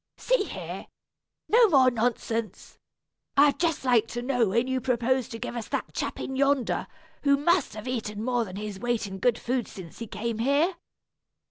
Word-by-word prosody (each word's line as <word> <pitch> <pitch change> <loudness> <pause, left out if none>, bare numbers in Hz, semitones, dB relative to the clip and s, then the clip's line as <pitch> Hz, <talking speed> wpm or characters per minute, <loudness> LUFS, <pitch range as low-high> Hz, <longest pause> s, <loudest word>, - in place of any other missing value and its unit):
"See - - +1
here! - - -7 0.6
No 460 0 +6
more 265 -5 +5
nonsense! 230 -2 -2 0.6
I'd 285 0 +5
just 330 -5 0
like 235 -3 +4
to 240 +1 -5
know 245 -3 +2
when 235 +5 +2
you 260 0 -1
propose 250 0 +1
to 230 - -6
give 235 - -5
us 235 -3 -4
that - - -3
chap - - -3
in 265 - -4
yonder, 275 -2 +1 0.3
who 280 -1 +4
must 310 - +2
have 215 +3 -7
eaten 220 -3 -3
more 245 -2 +1
than 185 -4 -8
his 205 -1 -5
weight 240 0 -1
in 195 -1 -7
good 235 +3 +2
food 250 -1 -2
since 175 -4 -11
he 230 - -5
came 225 +2 -3
here?" 285 +9 +2
245 Hz, 185 wpm, -27 LUFS, 225-275 Hz, 0.6 s, No